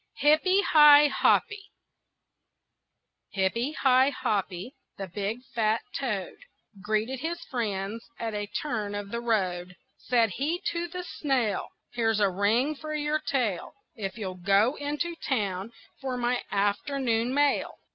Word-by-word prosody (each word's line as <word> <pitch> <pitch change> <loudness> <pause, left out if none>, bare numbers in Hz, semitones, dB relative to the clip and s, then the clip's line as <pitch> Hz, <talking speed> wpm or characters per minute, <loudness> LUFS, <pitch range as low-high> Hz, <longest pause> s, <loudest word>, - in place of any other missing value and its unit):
HIPPY 320 +7 +4
HI 295 -2 +8
HOPPY 420 +4 +2 1.7
Hippy 230 +9 0
Hi 260 -2 +4
Hoppy, 200 -3 -2 0.2
the 195 - -4
big 205 +6 -4
fat 220 -1 +1
toad, 210 -9 -3 0.4
Greeted 215 +5 -1
his 335 +4 -3
friends 215 -2 -3
at 225 -1 -4
a 205 0 -3
turn 215 -5 -3
of 205 -1 -5
the 235 - -3
road. 180 -6 -1 0.2
Said 230 -4 +2
he 300 - -1
to 340 0 -3
the 360 +2 -6
snail: 260 - -1 0.3
"Here's 225 -3 +1
a 200 -2 +3
ring 220 +10 +2
for 305 +1 -6
your 300 +1 0
tail 245 - -2 0.2
If 200 0 -5
you'll 185 -4 -6
go 200 +6 +4
into 295 +4 -3
town 205 - -2 0.3
for 260 -2 -3
my 245 0 0
afternoon 230 +4 0
mail." 285 +1 +1
235 Hz, 130 wpm, -27 LUFS, 205-290 Hz, 1.7 s, HI